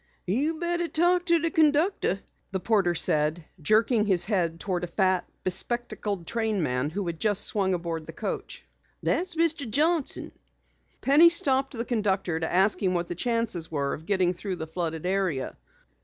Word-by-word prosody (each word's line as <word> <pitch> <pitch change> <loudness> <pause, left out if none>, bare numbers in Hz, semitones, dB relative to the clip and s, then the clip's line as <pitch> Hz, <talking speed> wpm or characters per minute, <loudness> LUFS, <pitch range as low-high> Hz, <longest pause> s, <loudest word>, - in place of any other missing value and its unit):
"You 275 - 0
betteh 345 +1 0
talk 350 +2 +2
to 340 -1 +4
de 330 0 -1
conductor," 305 - +2 0.3
the 190 - -2
porter 190 -4 +1
said, 155 +1 +1 0.2
jerking 215 - +2
his 180 -3 +3
head 175 -5 -1
toward 180 -2 -3
a - - -2
fat, 185 +1 0
bespectacled 205 -1 -1
trainman 165 - -1
who 195 +4 -4
had 170 -2 -5
just 205 -2 +2
swung 190 -3 +2
aboard 165 -2 -5
the - - -6
coach. - - -6 0.4
"Dat's 355 -1 0
Mr. 320 -6 +1
Johnson." 310 +4 +1 0.7
Penny 300 +5 +6
stopped 270 -5 +2
the 230 - -2
conductor 195 -8 -1
to 160 - -3
ask 190 +4 +3
him 185 -2 +1
what 175 0 -2
the - - -2
chances 230 -4 -1
were 140 -3 -2
of 160 - -9
getting 185 -3 +1
through 185 +1 -5
the 160 - -6
flooded 160 0 -4
area. 185 -8 -1
195 Hz, 165 wpm, -26 LUFS, 175-265 Hz, 0.7 s, Penny